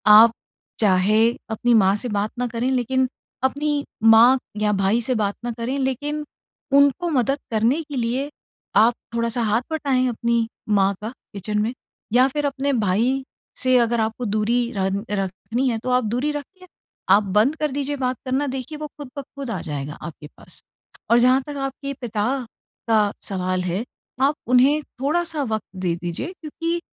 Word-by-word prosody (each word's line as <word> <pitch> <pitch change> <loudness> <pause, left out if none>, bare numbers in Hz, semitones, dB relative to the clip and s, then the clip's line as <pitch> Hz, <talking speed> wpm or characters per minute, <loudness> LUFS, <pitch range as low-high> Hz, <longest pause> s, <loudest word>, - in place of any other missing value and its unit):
आप 225 +1 +8 0.5
चाहे 195 +2 +4 0.4
अपनी 240 +2 +2
माँ 195 +1 +4
से 245 - -3
बात 205 +2 -1
ना 250 - 0
करें 235 +2 -1
लेकिन 260 +1 +1 0.4
अपनी 295 +3 -2 0.4
माँ 230 +2 +8 0.4
या 210 - +3
भाई 200 +5 +2
से 255 - +1
बात 200 0 0
ना 240 - -2
करें 245 +4 -2
लेकिन 295 +3 -3 0.6
उनको 285 +5 +3
मदद 270 +3 +2
करने 230 +8 +2
के 290 -2 -8
लिए 250 +4 -1 0.5
आप 220 +4 +6 0.2
थोड़ा-सा 235 +1 0
हाथ 220 +2 +2
बँटाएँ 275 -5 +1
अपनी 235 0 0 0.3
माँ 195 +1 +3
का 215 - -4 0.2
किचन 210 +1 -3
में 230 +4 -1 0.4
या 250 +2 +6
फिर 295 -1 -1
अपने 280 0 0
भाई 205 +5 +2 0.5
से 255 -1 +4
अगर 235 0 0
आपको 220 +3 -2
दूरी 235 +3 +2 0.2
रन 195 +1 -1
रखनी 205 +6 -2
है 230 - 0
तो - - -2
आप 250 0 +3
दूरी 250 +7 0
रखिए, 365 +6 -8 0.4
आप 205 +2 +6
बंद 260 +8 +4
कर 300 -3 -1
दीजिए 285 +1 -2
बात 255 -1 0
करना 265 +3 0
देखिए 265 +3 -5
वो 300 0 -5
खुद 285 -3 -8
ब 280 - -2
खुद 275 -3 -5
आ 190 - -2
जाएगा 145 -1 -4
आपके 150 -3 -8
पास। - - -10 0.5
और 235 - +6
जहाँ 255 +2 +5
तक 290 - -5
आपके 275 +1 -6
पिता 215 -4 -2 0.7
का 220 -1 +5 0.3
सवाल 185 -1 -1
है, 185 +5 -1 0.4
आप 285 +2 +3
उन्हें 265 +5 +4 0.2
थोड़ा-सा 320 +1 0
वक़्त 220 -5 -2 0.2
दे 175 -2 0
दीजिए 175 - -3
क्योंकि 330 +2 -3
245 Hz, 170 wpm, -22 LUFS, 215-280 Hz, 0.7 s, आप